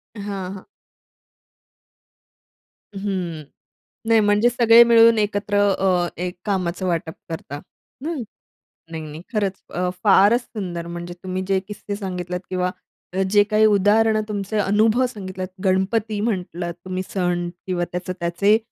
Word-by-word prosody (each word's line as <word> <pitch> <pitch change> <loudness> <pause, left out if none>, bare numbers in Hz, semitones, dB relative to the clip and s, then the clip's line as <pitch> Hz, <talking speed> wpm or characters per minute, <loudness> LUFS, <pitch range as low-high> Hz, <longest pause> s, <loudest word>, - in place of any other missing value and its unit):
हां, 205 - -7 0.3
हां. 195 - -10 2.3
हं, 185 -5 -3 0.6
नाही 225 0 +5
म्हणजे 210 +2 +4
सगळे 235 -1 +7
मिळून 230 -1 +6
एकत्र 205 -1 0 0.2
अ, 180 -2 +2
एक 180 0 -3
कामाचं 185 -2 -1
वाटप 165 -2 -1 0.2
करता, 165 -2 -6 0.5
हं? 320 -4 -2 0.7
नाही 160 -1 -5
नाही, 155 +1 -8
खरंच 200 -3 -1
अ, 180 0 0
फारच 205 +4 +5
सुंदर 180 -7 -6
म्हणजे 175 0 -6
तुम्ही 185 0 -3
जे 195 -1 +2
किस्से 205 -1 -6
सांगितलेत 180 -3 -4
किंवा 180 -1 0 0.4
अ, 190 - 0
जे 205 -1 +6
काही 215 +1 +3
उदाहरणं 215 +2 +4
तुमचे 205 +1 -3
अनुभव 215 +5 +3
सांगितलात 185 -4 -6 0.2
गणपती 205 +3 +1
म्हटलात 180 -5 -2
तुम्ही 185 0 -3
सण 175 -2 -1 0.2
किंवा 175 -2 0
त्याचं 180 +1 -4
त्याचे 190 +5 +3
195 Hz, 130 wpm, -22 LUFS, 180-215 Hz, 2.3 s, सगळे